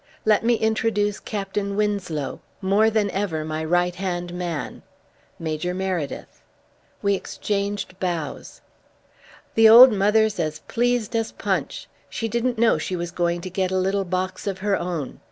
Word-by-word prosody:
"Let 215 -1 +4
me 235 +1 +3
introduce 220 -2 0
Captain 200 -1 -3
Winslow, 200 -8 -2 0.2
more 200 +3 +3
than 210 -2 +1
ever 175 -6 -2
my 155 0 -3
right 175 +2 +1
hand 175 -1 -4
man 175 -3 -4 0.6
Major 165 +2 -3
Meredyth." 185 -6 -4 0.6
We 200 0 +3
exchanged 200 -1 -3
bows. 170 -5 -4 0.9
"The 225 0 +7
old 245 +3 +10
mother's 210 0 +2
as 155 -2 -1
pleased 240 -1 0
as 225 -1 0
Punch. - - -3 0.2
She 225 - -3
didn't 235 +2 -1
know 225 -8 +3
she 185 - -3
was 175 -1 -4
going 175 0 -1
to 185 - -6
get 185 0 0
a 190 - 0
little 195 +1 +1
box 185 +1 -3
of 195 -2 -2
her 205 -1 +3
own. 170 -8 -4
195 Hz, 150 wpm, -23 LUFS, 175-210 Hz, 0.9 s, old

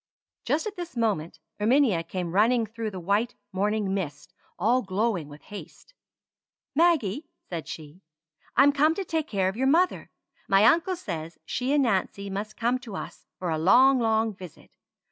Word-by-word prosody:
Just 305 +2 0
at 425 -2 -5
this 345 -7 -7
moment 195 -9 -1 0.2
Erminia 225 -4 +3
came 175 0 -4
running 225 +5 +3
through 225 +1 -5
the 190 -3 -7
white 205 +7 0 0.2
morning 205 +1 0
mist 175 -3 -5 0.2
all 235 +8 +2
glowing 195 -4 -1
with 145 +1 -13
haste. 210 - -11 0.8
"Maggie," 310 - +2 0.2
said 165 -5 -4
she, 155 +3 -9 0.6
"I'm 275 +3 +7
come 300 +3 +3
to 390 - -3
take 320 -2 -2
care 195 -3 0
of 190 - -2
your 265 +2 +1
mother. 345 +6 +2 0.4
My 195 +2 +5
uncle 340 - +4
says 170 - -6
she 255 +2 -2
and 290 -1 +4
Nancy 200 -3 -1
must 210 +2 -5
come 245 +2 +1
to 230 -6 -9
us - - -8
for 180 -2 -3
a 160 - -1
long, 255 +10 +6
long 220 -1 +1
visit. 185 -4 -13
220 Hz, 165 wpm, -26 LUFS, 185-265 Hz, 0.8 s, I'm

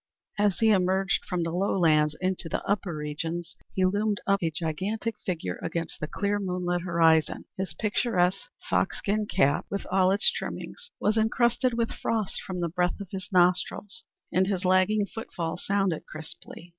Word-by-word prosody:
As 205 -3 +3
he 225 -1 +4
emerged 190 0 +2
from 180 -2 0
the 165 - -2
lowlands 165 -5 +3
into 185 -2 -2
the - - -2
upper 195 -4 -1
regions, 165 +3 -4 0.2
he 185 - +3
loomed 205 +2 +1
up 200 0 +2
a 165 - +1
gigantic 185 +8 -2
figure 160 - -2
against 170 -1 -3
the 150 - -3
clear, 205 +4 -1
moonlit 180 -2 -1
horizon. 165 -3 +3
His 185 -4 -4
picturesque 210 - +1 0.2
foxskin 210 +1 0
cap 140 -6 +2
with 200 - -3
all 185 0 +4
its 200 +3 +4
trimmings 480 0 -6
was 215 +2 +2
incrusted 240 +2 +2
with 230 -1 0
frost 220 -4 -2
from 180 -2 -5
the 170 - 0
breath 180 +3 0
of 200 -3 -7
his 190 -2 -5
nostrils, 180 +2 +1 0.3
and 185 +1 +3
his 190 -2 -1
lagging 185 +3 +3
footfall 180 -6 -4
sounded 195 -3 -1
crisply. 160 +2 -10
185 Hz, 160 wpm, -27 LUFS, 170-205 Hz, 0.3 s, he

